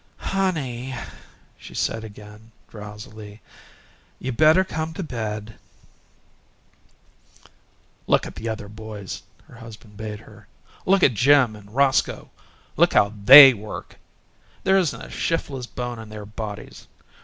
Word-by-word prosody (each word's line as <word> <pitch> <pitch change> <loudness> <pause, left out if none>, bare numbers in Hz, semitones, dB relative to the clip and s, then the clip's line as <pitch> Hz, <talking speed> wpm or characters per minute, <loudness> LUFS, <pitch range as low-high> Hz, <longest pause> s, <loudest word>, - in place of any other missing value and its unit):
"Honey," 135 -10 -2 0.6
she - - -13
said 110 0 -2
again, 105 +1 -13 0.2
drowsily, 105 0 -11 0.8
"you 130 - -4
better 155 +8 +4
come 160 -3 -5
to 190 - -4
bed." 110 -6 -5 2.5
"Look - - +2
at - - -8
the 115 +1 -6
other 110 -2 -5
boys," 105 -2 -8 0.3
her 120 - -15
husband 110 -2 -13
bade 105 -1 -6
her. - - -17 0.4
"Look 195 0 +3
at 130 - +5
Jim 125 0 +4
and 105 +1 -15
Roscoe. 135 -1 +1 0.5
Look - - +3
at - - +5
how 100 +1 +3
THEY 135 +2 +12
work! 105 -1 -9 0.6
There 190 0 +3
isn't 175 -5 -1
a - - -11
shiftless 135 -6 -3
bone 120 -1 -6
in 110 -1 -10
their 105 -1 -9
bodies. 105 0 -8
115 Hz, 130 wpm, -23 LUFS, 105-135 Hz, 2.5 s, THEY